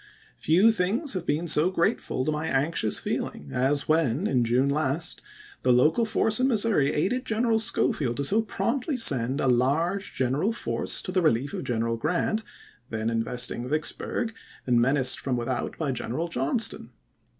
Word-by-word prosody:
Few 185 +8 +4
things 220 - -1
have 180 -3 -4
been 155 +4 -1
so 155 +2 +4
grate 190 +4 0
ful 130 - -3
to 155 - 0
my 150 +1 -3
anxious 135 -6 0
feeling 75 -1 -4
as 135 +3 +1
when, 155 - +1
in 125 - +1
June 125 +4 +1
last, 150 +3 -1 0.4
the - - +2
local 155 - +3
force 220 0 +1
in 255 - +3
Missouri 210 - +2
aided 225 +12 -1
General 225 -1 0
Schofield 145 - 0
to 140 - -1
so 205 +10 +3
promptly 240 +7 -2
send 135 - +5
a - - 0
large 145 +10 0
general 135 - 0
force 115 - -3
to - - -5
the 185 0 +1
relief 140 -3 +1
of - - -5
General 115 -1 -1
Grant, 180 - -1 0.5
then 110 0 -2
investing 120 +2 -1
Vicksburg, 155 - -1 0.3
and 120 -2 +3
menaced 130 +1 +1
from 130 -3 -2
without 120 +1 -3
by 150 -4 -2
General 125 +7 -4
Johnston. 165 - -1
150 Hz, 165 wpm, -26 LUFS, 125-195 Hz, 0.5 s, send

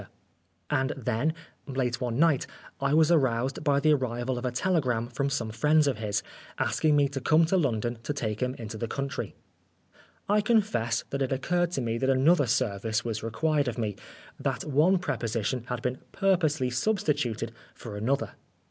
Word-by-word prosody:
Oscar - - -16 0.6
Wilde 135 0 +1
And 130 - -11
then, 125 +6 +1 0.3
late 130 -3 -1
one 120 -2 -1
night, 160 -3 +3 0.3
I 140 0 0
was 155 +2 +4
aroused 130 -3 +1
by 140 -2 +3
the 155 +2 +4
arrival 125 -2 -1
of 125 - -6
a - - -1
telegram 125 -6 0
from 140 +3 -1
some 120 -5 -2
friends 150 +7 +3
of 135 -6 0
his, 105 -2 -1 0.3
asking 155 -1 +2
me 145 -1 +4
to 135 -1 -4
come 160 +4 +4
to 165 - +1
London 120 - 0
to 145 - -3
take 110 -7 -3
him 125 0 0
into 110 -1 -7
the 115 - -2
country. 140 - -4 0.9
I 210 +1 +3
confess 195 - +1
that 140 - -2
it 135 - 0
occurred 175 +6 +1
to 135 - -1
me 115 -1 -1
that 130 - +1
another 140 +2 +4
service 110 -1 0
was 110 -2 -2
required 145 +6 0
of 120 -1 -3
me 105 -4 -2 0.4
that - - -2
one 155 +7 +3
preposition 120 - -2
had 125 -1 -4
been 125 +1 -2
purposely 160 -9 +1
substituted 130 - 0 0.2
for 110 -4 -8
another. 120 +7 -1
130 Hz, 180 wpm, -28 LUFS, 115-150 Hz, 0.9 s, was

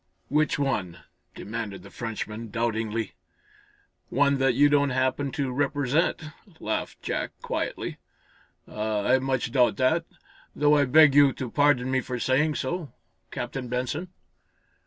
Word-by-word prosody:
"Which 150 +2 +2
one?" 105 - -1 0.4
demanded 105 -3 -6
the - - -13
Frenchman, 115 0 -5
doubtingly. 115 -1 -2 1.0
"One 140 +1 +2
that 135 -2 +2
you 145 +3 +6
don't 145 -1 +3
happen 130 +2 0
to 135 -2 -2
represent," 145 +4 0 0.4
laughed 110 - -4
Jack, - - -3
quietly. - - -3 0.7
"Ah, 105 -1 -2
I 130 +1 +4
much 130 -3 -1
doubt 125 -1 +3
it, 160 +6 +2 0.5
though 150 0 +4
I 145 -1 +4
beg 155 +2 +6
you 140 -2 +6
to 125 -3 -6
pardon 145 -3 +3
me 130 0 +2
for 125 -1 -5
saying 140 +5 +1
so, 160 +3 -3 0.4
Captain 135 -2 -5
Benson." 130 +8 -3
130 Hz, 135 wpm, -26 LUFS, 115-145 Hz, 1.0 s, you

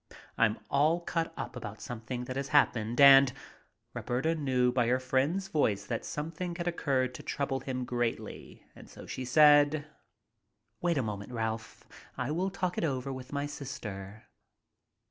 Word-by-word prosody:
I'm 110 -1 +2
all 155 +5 +3
cut 165 -1 -2
up - - -5
about - - -7
something 120 +1 -5
that 130 +1 -6
has 135 0 -2
happened 120 -6 +2
and 135 -1 +9 0.3
" - - -44
Roberta 130 +7 -1
knew 130 -5 +1
by 120 -2 +1
her 125 +2 +2
friend's 140 +9 0
voice 105 - 0
that 115 +1 -3
something 165 +3 -4
had 170 0 -4
occurred 135 -7 0
to - - -8
trouble 135 -1 -2
him 130 -1 -4
greatly, 120 -1 -4
and - - -14
so - - -11
she 130 - -5
said: 145 +2 +5 1.0
"Wait 175 -2 +1
a 135 - +1
moment, 105 0 -5
Ralph. 110 -1 -4 0.3
I 130 +3 -2
will 180 +5 0
talk 185 -2 -2
it - - -2
over 135 -3 -2
with 130 -1 -9
my 140 0 -2
sister." 110 -8 -7
135 Hz, 165 wpm, -30 LUFS, 120-150 Hz, 1.0 s, and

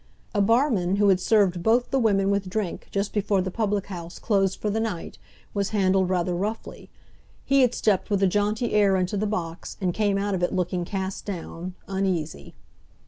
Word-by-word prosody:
A 205 - +2
barman, 220 -4 +2
who 205 0 +4
had 185 -2 +4
served 190 -3 +2
both 235 +6 +2
the 270 - +2
women 200 -4 +2
with 200 -2 -1
drink 200 -2 -3
just 200 +1 -2
before 205 -1 +1
the 185 0 -2
public 205 -1 -1
house 175 -3 -8
closed 195 -3 +1
for 210 - -1
the 220 - 0
night, 215 -7 -4 0.3
was 200 -1 -1
handled 190 -1 +3
rather 180 -1 0
roughly. 210 +5 -4 0.6
He 275 0 +4
had 250 -2 +3
stepped 205 -4 +1
with 200 -2 +1
a - - +6
jaunty 210 +4 0
air 205 -2 +4
into 185 +3 -1
the 210 +1 0
box, 175 -5 -4
and 185 -3 0
came 205 -1 +1
out 200 0 -1
of 185 - -1
it 175 - 0
looking 180 -1 -1
cast 190 0 -4
down, 180 -2 -6
uneasy. 180 - -2
195 Hz, 195 wpm, -25 LUFS, 185-210 Hz, 0.6 s, a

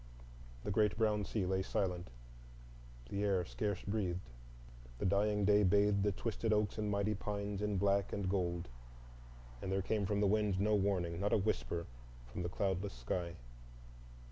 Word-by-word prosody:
The - - -2
great 105 +1 +2
brown 105 -2 +2
sea 100 0 -1
lay 95 +1 +1
silent. 90 -2 -1 1.0
The 100 +1 -1
air 95 -3 +2
scarce 100 +1 -2
breathed. 95 - -2 0.7
The - - -2
dying 100 +1 +2
day 105 +1 +5
bathed 100 +1 +4
the 105 +1 +2
twisted 115 +2 -2
oaks 105 0 +1
and 105 -1 0
mighty 100 +1 +1
pines 100 0 -3
in 105 -1 0
black 100 0 +2
and 100 -2 -2
gold. 90 -2 -1 0.9
There 95 0 -1
came 105 -1 0
from 105 0 +1
the 105 - +3
wind 105 -2 +2
no 105 +2 +2
warning, 95 -4 +1
not 100 +2 +1
a - - +6
whisper 95 -4 -1 0.4
from - - -6
the 85 - -2
cloudless 95 +1 -1
sky. 85 +8 -3
100 Hz, 160 wpm, -36 LUFS, 95-105 Hz, 1.0 s, a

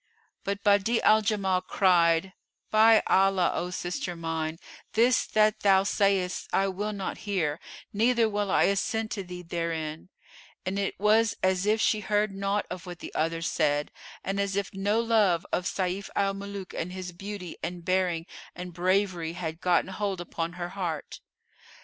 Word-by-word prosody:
But 200 0 -3
Badi'a 205 +3 +3
al 215 0 +6
Jamal 200 -4 +1
cried, 175 -1 +3 0.4
"By 220 +1 +6
Allah, 195 -1 +3
O 175 - -2
sister 180 0 -4
mine, 165 -1 -3 0.4
this 235 +3 +3
that 215 0 +3
thou 195 -1 +4
sayest 195 -2 +1
I 195 0 +2
will 205 +3 -3
not 200 -2 -4
hear, 165 -6 0 0.3
neither 230 +2 +3
will 205 -1 -1
I - - +4
assent 220 +3 0
to 200 - -3
thee 180 0 -8
therein;" 165 -1 -4 0.6
and 190 +2 -1
it 195 -2 -2
was 215 +2 +3
as 185 +1 +2
if 215 +1 +3
she 215 0 +2
heard 210 0 0
naught 200 +1 -1
of 180 -1 -6
what 175 -1 -7
the - - -9
other 165 +1 -1
said 150 -3 0 0.3
and 195 +1 -2
as 200 -1 0
if 200 -1 -2
no 200 +3 +1
love 215 -7 +2
of 180 - 0
Sayf 190 +1 -2
al 195 0 +1
Muluk 200 -1 -7
and 180 - -4
his 185 -1 -6
beauty 195 -1 -7
and 170 +1 -5
bearing 185 -3 +1 0.3
and 180 0 -7
bravery 180 -2 0
had 165 -2 -5
gotten 180 +1 +2
hold 195 -1 -2
upon 170 -1 -4
her 175 -1 -5
heart. 175 -6 -4
190 Hz, 165 wpm, -27 LUFS, 175-205 Hz, 0.6 s, al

